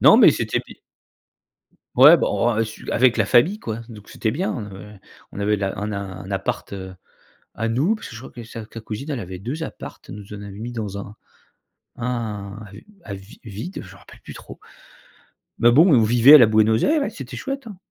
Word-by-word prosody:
Non - - +8
mais - - +8
c'était - - -1
bi - - -14 1.2
Ouais - - +9
bon, 120 0 0
heu, 115 - +2
su 110 - -8
avec 125 +1 +3
la 115 - +2
famille 145 - +3
quoi. 115 - -5
Donc 105 -3 -12
c'était 110 - -2
bien. 175 - -2
On 110 -6 -5
avait 100 0 -12 0.3
on - - -7
avait 105 +1 +1
la 100 0 -3
un 105 +1 -3
a - - -3
un 95 -1 -8
appart, 95 0 -3
heu, 95 -1 -7 0.6
à 115 +1 -2
nous 140 - +1
parce 215 - -9
que - - -11
je 115 - -9
crois - - -11
que 120 - -9
sa 115 0 -8
sa 115 - -8
cousine 115 +7 -6
elle 135 -5 -3
avait 95 -1 -7
2 130 - -5
apparts, - - -8
elle - - -8
nous 105 0 -10
en 105 - -8
avait 100 -1 -9
mis 120 +3 -6
dans 105 -4 -5
un 100 +1 -8 0.8
un 110 -4 -4 0.4
à 100 - -7
vi 95 +2 -12
vide, 115 - -7
je 95 -1 -13
me - - -15
rappelle - - -17
plus - - -10
trop. - - -12 1.0
Mais 120 - +5
bon, 160 +9 +6
on 120 -4 +5
vivait 120 +6 +7
à - - +12
la 120 - +7
Buenos 110 +1 +3
Aires, 305 -2 +2
c'était 135 - -8
chouette, 275 -2 -5
hein. 205 -4 -9
110 Hz, 220 wpm, -22 LUFS, 100-125 Hz, 1.2 s, à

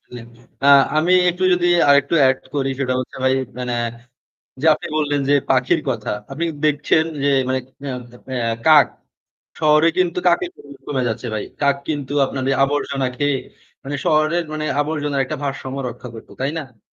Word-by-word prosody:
আসলে 125 -1 -11 0.4
আ - - +4 0.3
আমি 170 +4 +3 0.2
একটু 180 +2 -6
যদি 175 0 +2 0.2
আরেকটু 140 +3 +4
এড 130 0 +2 0.2
করি, 135 -1 0
সেটা 130 -1 0
হচ্ছে 130 - -8
ভাই 130 0 +3 0.2
মানে 125 -1 -3 0.9
যে 160 - -1
আপনি - - -6
বললেন 145 -2 0
যে, - - +5 0.2
পাখির 130 +5 +2
কথা। 115 -4 -3 0.2
আপনি 165 +5 -2 0.2
দেখছেন 150 +1 +2 0.2
যে - - +2 0.2
মানে 130 0 0 0.2
অ্যা 140 - -4 0.6
এ - - -7
কাক। 155 -2 +7 0.7
শহরে 155 0 +4
কিন্তু 180 -1 +1
কাকের 345 - +2
পরিমান 140 -1 -15
কমে 135 -3 -1
যাচ্ছে 115 +2 -4
ভাই। 105 - -3 0.2
কাক 140 -1 +3
কিন্তু 145 -3 -3
আপনার 130 0 -4
এই 135 - +1
আবর্জনা 140 -1 -1
খেয়ে, 145 -1 +1 0.5
মানে 145 +1 -3
শহরের 155 +2 +2
মানে 155 0 -3 0.2
আবর্জনার 145 -2 -1
একটা - - -5
ভারসাম্য 135 -1 -4
রক্ষা 125 +1 -9
করতো, 115 - -12
তাই 135 - 0
না? 130 -8 -10
140 Hz, 170 wpm, -20 LUFS, 130-155 Hz, 0.9 s, কাক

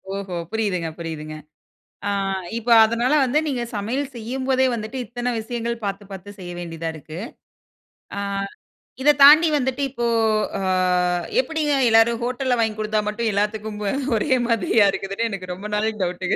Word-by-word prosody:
ஓஹோ! 195 -2 -5 0.2
புரியுதுங்க, 195 -7 -1
புரியுதுங்க. 155 -2 -6 0.7
அ - - +1 0.5
இப்ப 235 +1 -4
அதனால 235 +4 +1
வந்து, 265 +3 +1
நீங்க 255 -4 -2
சமையல் 260 +7 -2
செய்யும்போதே 260 +3 0
வந்துட்டு, 220 +3 -5
இத்தனை 245 +2 -3
விஷயங்கள் 235 +1 -4
பார்த்து 200 0 -3
பார்த்து 195 +1 -9
செய்ய 175 -1 -7
வேண்டியதா 165 -1 -4
இருக்கு. 155 +1 -9 1.0
அ - - -1 0.8
இதை 295 +2 +6
தாண்டி 310 +4 +9
வந்துட்டு 265 -1 -1
இப்போ 240 -2 -3 0.5
அ - - -3 0.8
எப்படிங்க 315 -10 0 0.2
எல்லாரும் 225 +1 +4
ஹோட்டல 250 +1 0
வாங்கிக் 220 -1 0
குடுத்தா 215 0 0
மட்டும், 225 +2 -1
எல்லாத்துக்கும் 210 +1 -2 0.4
ஒரே 260 +6 +1
மாதிரியா 225 -2 +3
இருக்குதுனு, 195 +4 -2
எனக்கு 185 -2 -6
ரொம்ப 200 +4 -7
நாள் 215 +1 +1
டவுட்டுங்க. 180 +1 -1
220 Hz, 140 wpm, -22 LUFS, 195-245 Hz, 1.0 s, தாண்டி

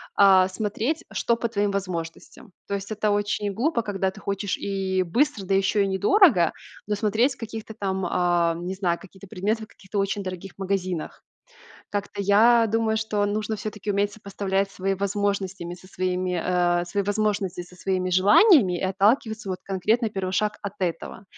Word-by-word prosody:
а, 190 -2 +6
смотреть, 220 - -2
что 235 - +1
по 235 0 -2
твоим 205 -2 0
возможностям. 185 -1 -5 0.2
То 200 - -1
есть 200 +1 -6
это 215 0 0
очень 205 0 0
глупо, 235 - 0
когда 195 -3 -1
ты 210 - -13
хочешь 200 0 -2
и 190 -1 -1
быстро, 230 - 0
да 195 +1 +1
еще 195 +1 +2
и 195 - 0
недорого, 200 - +4 0.3
но 210 - -1
смотреть 220 +6 +1
каких-то 225 -1 -7
там, 190 -3 -2
ам, 175 -1 +1
не 190 - -3
знаю, 175 -3 0
какие-то 195 +1 -14
предметы 215 +3 -2
в - - -9
каких-то 205 -1 -8
очень 195 +1 0
дорогих 185 0 -6
магазинах. 185 -3 -3 0.7
Как-то 205 0 -3
я 225 +4 +5
думаю, 220 0 +1
что 215 -2 0
нужно 215 +1 -2
всё-таки 210 0 -5
уметь 200 +1 +1
сопоставлять 195 -1 -2
свои 195 0 -1
возможностями 195 -2 -2
со 185 +1 -16
своими 185 -1 -1
э, 175 -1 +1
свои 200 +3 -1
возможности 205 -3 -1
со 180 +1 -16
своими 185 0 -1
желаниями 200 - +5
и - - -5
отталкиваться 210 +3 +1
вот 185 - -3
конкретно, 215 +5 +1
первый 195 -3 -3
шаг, 210 +2 0
от 200 - -5
этого. 185 +2 -4
200 Hz, 170 wpm, -24 LUFS, 185-215 Hz, 0.7 s, а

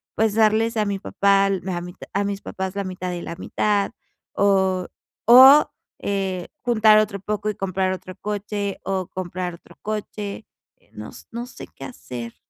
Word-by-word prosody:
pues 220 -1 +2
darles 225 +1 +3
a 210 - +2
mi 200 -1 -2
papá, 200 0 +3
al 195 -2 0
me 190 -1 -3
a 175 - -3
mi 175 0 -8 0.2
a 200 +1 +1
mis 200 0 -3
papás 190 0 -5
la 200 - -1
mitad 185 -1 -4
y 175 - -5
la 170 - -6
mitad, 205 +2 0 0.4
o 190 -2 +2 0.4
o, 265 +5 +9 0.3
eh, 190 -3 -2
juntar 220 -3 +5
otro 200 -2 -1
poco 210 +1 -2
y 210 - -3
comprar 190 0 -1
otro 185 0 -8
coche, 205 -1 -3
o 190 -2 -2
comprar 180 -1 -4
otro - - -19
coche, 210 0 -5 0.3
eh, - - -33
no - - -8 0.2
no 235 +1 -5
sé - - -10
qué - - -8
hacer. 120 - -8
200 Hz, 180 wpm, -23 LUFS, 185-215 Hz, 0.4 s, o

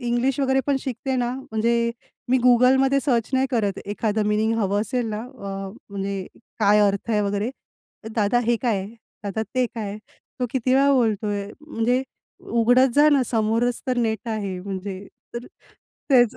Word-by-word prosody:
English 245 +2 0
वगैरे 265 0 +2
पण 285 -1 +2
शिकते 265 +1 -3
ना 245 -1 0
म्हणजे 235 -2 0 0.4
मी 260 - +5
Googleमध्ये 265 +3 +5
सर्च 240 -4 +1
नाही 265 0 +3
करत 210 -6 0
एखादं 210 +1 -1
मीनिंग 215 +2 +2
हवं 200 -1 +1
असेल 230 +2 -1
ना 210 +1 -3
अ, 195 -6 -7 0.2
म्हणजे 195 -1 -3 0.3
काय 210 0 +5
अर्थ 200 +2 +1
आहे 210 -1 +2
वगैरे, 205 +3 -1 0.6
"दादा 215 +2 +2
हे 235 0 +3
काय? 215 -6 +1 0.4
दादा 200 +2 -2
ते 255 0 +3
काय?" 210 -3 -5 0.4
तो 250 - +1
किती 255 0 +1
वेळा 280 +1 +5
बोलतोय 210 -5 +1
म्हणजे, 250 -3 0 0.4
"उघडत 245 +3 +3
जा 295 +1 +6
ना 280 -2 +4
समोरच 230 +2 +1
तर 255 -1 0
नेट 225 0 -1
आहे" 200 -4 -3
म्हणजे. 195 0 -6 0.3
तर 235 +1 -5 0.6
त्याचं 245 -4 +5
230 Hz, 160 wpm, -23 LUFS, 205-255 Hz, 0.6 s, जा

